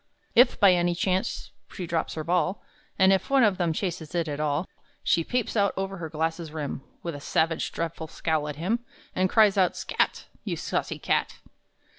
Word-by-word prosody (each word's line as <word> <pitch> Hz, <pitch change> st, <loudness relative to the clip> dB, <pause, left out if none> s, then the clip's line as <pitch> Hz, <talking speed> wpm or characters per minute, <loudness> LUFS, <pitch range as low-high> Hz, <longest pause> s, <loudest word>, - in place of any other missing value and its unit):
If 245 Hz, +1 st, +5 dB
by 195 Hz, -2 st, +7 dB
any 175 Hz, 0 st, +1 dB
chance 185 Hz, +1 st, -1 dB, 0.2 s
she 180 Hz, -, -5 dB
drops 165 Hz, -1 st, -2 dB
her 155 Hz, -, -3 dB
ball, 180 Hz, +4 st, 0 dB, 0.3 s
And 190 Hz, 0 st, +6 dB
if 190 Hz, -, 0 dB
one 275 Hz, -2 st, +5 dB
of 200 Hz, -4 st, +3 dB
them 170 Hz, -2 st, +2 dB
chases 170 Hz, -2 st, -4 dB
it 170 Hz, -2 st, 0 dB
at 145 Hz, -1 st, -4 dB
all, 150 Hz, +3 st, 0 dB, 0.4 s
She 165 Hz, -, +3 dB
peeps 245 Hz, +5 st, -1 dB
out 200 Hz, -2 st, +2 dB
over 195 Hz, 0 st, -3 dB
her 165 Hz, -2 st, -5 dB
glasses' 160 Hz, +1 st, -2 dB
rim 150 Hz, -4 st, -4 dB, 0.2 s
With 170 Hz, -, -3 dB
a 145 Hz, -, -8 dB
savage, 165 Hz, +2 st, 0 dB
dreadful 165 Hz, -1 st, -4 dB
scowl 155 Hz, -1 st, -1 dB
at 150 Hz, -, -4 dB
him, 185 Hz, +10 st, 0 dB, 0.4 s
And 185 Hz, 0 st, +2 dB
cries 210 Hz, -3 st, +5 dB
out, 185 Hz, -2 st, +2 dB
"Scat, -, -, -1 dB, 0.2 s
You -, -, -2 dB
saucy -, -, -2 dB
cat!" -, -, 0 dB
175 Hz, 190 wpm, -26 LUFS, 160-195 Hz, 0.4 s, by